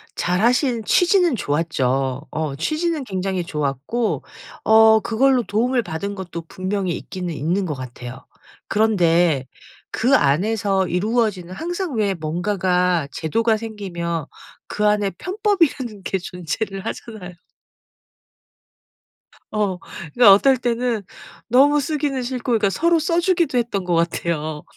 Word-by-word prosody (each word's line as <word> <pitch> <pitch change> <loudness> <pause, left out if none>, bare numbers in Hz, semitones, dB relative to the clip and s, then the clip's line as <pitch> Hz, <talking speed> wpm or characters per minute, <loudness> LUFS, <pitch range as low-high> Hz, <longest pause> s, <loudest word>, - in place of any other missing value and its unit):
잘 180 +1 0
하신 245 0 +2
취지는 355 - +3
좋았죠. 135 - -1
어 155 -3 -3
취지는 310 - -1
굉장히 190 -4 -2
좋았고 150 - -2 0.4
어 220 0 +6
그걸로 250 +3 +2
도움을 240 +4 0
받은 200 +4 -4
것도 175 -3 -6
분명히 185 +1 -2
있기는 180 -3 -5
있는 170 +6 -1
것 160 - -2
같아요. 125 0 -9 0.4
그런데 175 -9 +2 0.5
그 250 +5 +3
안에서 195 - +1
이루어지는 200 -1 -1
항상 350 - -4
왜 205 -3 +1
뭔가가 180 0 0
제도가 225 +8 0
생기면 175 -8 -4 0.4
그 210 - -2
안에 210 -1 +2
편법이라는 340 - 0
게 190 - -1
존재를 185 +3 -5
하잖아요. 215 -6 -7 2.2
어. 205 -4 0 0.4
그게 245 - +2
어떨 230 +7 +7
때는 240 -2 -1 0.4
너무 280 +5 +5
쓰기는 290 -2 -1
싫고 250 0 -4
그러니까 215 -4 +2
서로 335 - +2
써 335 +2 +1
주기도 345 -6 +1
했던 225 -6 -1
것 175 -1 +1
같아요. 165 -2 -1
200 Hz, 270 characters per minute, -21 LUFS, 170-245 Hz, 2.2 s, 어떨